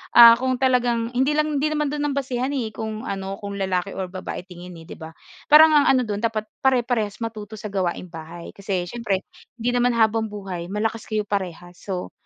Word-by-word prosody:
ah, 235 -1 +11
kung 255 0 0
talagang 245 -3 +2
hindi 265 +4 +2
lang 305 0 +1
hindi 305 +2 0
naman 300 -1 0
do'n 295 0 -2
ang - - -4
basehan, 260 -1 -1
eh, 240 -5 -2
kung 220 0 -5
ano, 195 0 -4
kung 200 -1 -6
lalaki 190 -1 -2
o 190 - -2
babae 185 -1 -6
tingin 180 0 -10
eh, 165 - -13
'di - - -10
ba? 160 0 -10 0.3
Parang 310 +1 +8
ang 290 - +5
ano 260 -1 +4
do'n 205 -3 -3
dapat 220 -2 0 0.2
,pare-parehas 240 -5 +1
matuto 220 -2 -6
sa 210 -1 -7
gawaing 180 -2 -2
bahay. 165 +1 -9
Kasi 195 -2 -2
siyempre 200 -5 -2 0.3
hindi 235 0 -2
naman 245 0 +2
habang 220 0 +2
buhay 195 -5 -6
malakas 220 +2 -2
kayo 215 -1 -1
parehas. 180 -3 -4
So 185 -3 -5
215 Hz, 200 wpm, -23 LUFS, 190-245 Hz, 0.3 s, ah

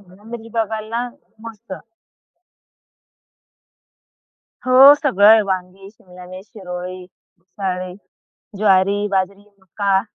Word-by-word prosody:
शिमला 190 +1 -21
मिर्च 230 0 -10
बघाल 220 -1 -3
ना, 240 +2 -3 0.4
मस्त. 215 -2 -13 2.9
हो, 265 +3 +8
सगळ 205 -8 +2
आहे 220 +1 +7
वांगी, 190 +1 -5
शिमला 180 -4 -16
मिर्च, 185 +2 -11
शिरोळी, 180 -3 -8 0.3
भुसाळी, 185 0 -6 0.6
ज्वारी, 200 0 +2
बाजरी 195 +1 -2
मका. 195 +1 -1
195 Hz, 95 wpm, -19 LUFS, 185-220 Hz, 2.9 s, हो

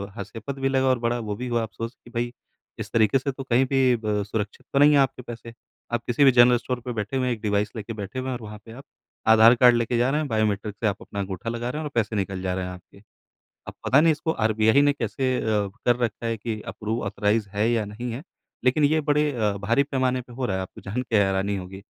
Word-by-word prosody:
हास्यपद 125 +4 -7
भी 135 0 +1
लगा 135 0 +2
और 130 -1 +3
बड़ा 120 +1 0
वो 105 -3 -4
भी 125 +4 -5
हुआ 120 -1 0
अफ़सोस 115 +1 -6
कि - - -13
भई 120 +1 -1 0.5
इस - - -6
तरीके 110 +3 +3
से 140 +2 -2
तो 135 +1 -7
कहीं 130 0 +2
भी 130 -1 +3
ब 105 -1 0
सुरक्षित 105 0 -5
तो 140 - +3
नहीं 145 +1 +7
है - - +5
आपके 135 -1 +1
पैसे। 115 -1 -9 0.4
आप 120 0 0
किसी 120 +4 +2
भी 135 - +8
जनरल 120 0 +6
स्टोर 125 +1 -4
पे 125 +1 -5
बैठे 110 +4 -3
हुए 130 -1 0
हैं 125 - +1
एक 110 - -8
डिवाइस 105 0 0
लेके 110 +1 -5
बैठे 105 +3 -6
हुए 130 - -4
हैं - - -2
और - - -17
वहाँ 105 -1 -9
पे 115 - -12
आप 130 +5 -11 0.4
आधार 110 +2 +7
कार्ड 125 0 +6
लेके 120 0 0
जा 120 +2 +2
रहे 150 +3 +1
हैं 155 - -2
बायोमेट्रिक 105 -3 -1
से 110 - -1
आप 100 -1 -1
अपना 100 - -7
अंगूठा 95 +2 -4
लगा 120 +1 -3
रहे 150 - -4
हैं - - -4
और 150 - -5
पैसे 110 -2 0
निकल 95 -2 -2
जा 95 -1 -1
रहे 95 -1 -3
हैं 90 - -5
आपके। 90 +2 -14 0.7
अब - - -6
पता 135 - +5
नहीं 165 0 +5
इसको 155 +1 -1
आरबीआई 110 0 +3
ने 145 0 +4
कैसे 130 +1 -1
अ, - - -2 0.4
कर 120 - +4
रखा 115 -1 -2
है 115 0 -1
कि 110 0 -4
अप्रूव, 110 +2 -3
ऑथराइज़ 105 +1 0
है 105 +3 0
या 115 -3 +1
नहीं 115 +4 -6
है। 125 +6 -6 0.4
लेकिन 130 +4 +3
ये 155 +2 +2
बड़े 150 0 +3
अ, 110 -4 +1
भारी 115 +7 +2
पैमाने 130 -2 0
पे 125 0 -15
हो 125 +1 -3
रहा 95 - -1
है 95 - -2
आपको 95 - -9
जानके 115 +2 -1
हैरानी 95 +1 0
होगी। 95 +1 -8
115 Hz, 260 wpm, -24 LUFS, 105-130 Hz, 0.7 s, भी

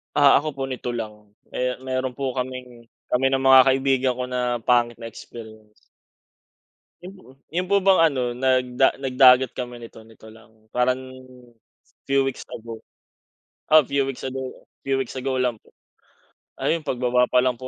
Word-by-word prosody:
Ah, 140 -1 +6
ako 155 - -6
po 135 - -4
nito 125 -2 -4
lang, 105 -2 -7 0.2
eh, 125 0 -2
meron 130 -1 -3
po 135 -1 -2
kaming 125 -2 -7 0.2
kami 125 +2 +1
ng 135 0 0
mga 130 0 +8
kaibigan 130 -1 +2
ko 125 - -4
na 125 -2 -2
pangit 120 -1 +2
na 115 0 -9
experience. 110 -2 -13 1.3
Mhm. 185 -8 -13 0.2
Yung 180 +2 -2
po 200 -1 +2
bang 195 -3 +5
ano, 125 -3 -2
nag 125 0 0
da 135 - +4
nag 135 -2 -5
dagat 130 -1 +7
kami 120 -1 -7
nito 115 - -12
nito 110 -1 -16
lang. 110 0 -21
Parang, 125 +1 +1 1.1
few 135 0 +3
weeks 135 - -6
ago. 115 0 -8 0.9
Ah, 155 -1 +7
few 140 0 0
weeks 135 -2 -6
ago 130 0 -4 0.4
few 135 -1 0
weeks 130 +1 -7
ago 130 0 -2
lang 125 -2 0
po. - - -26 0.9
Ayun 165 -1 0
pagbaba 125 0 +1
pa 125 - +4
lang 125 -1 +1
po 130 - -7
125 Hz, 165 wpm, -23 LUFS, 120-135 Hz, 1.3 s, mga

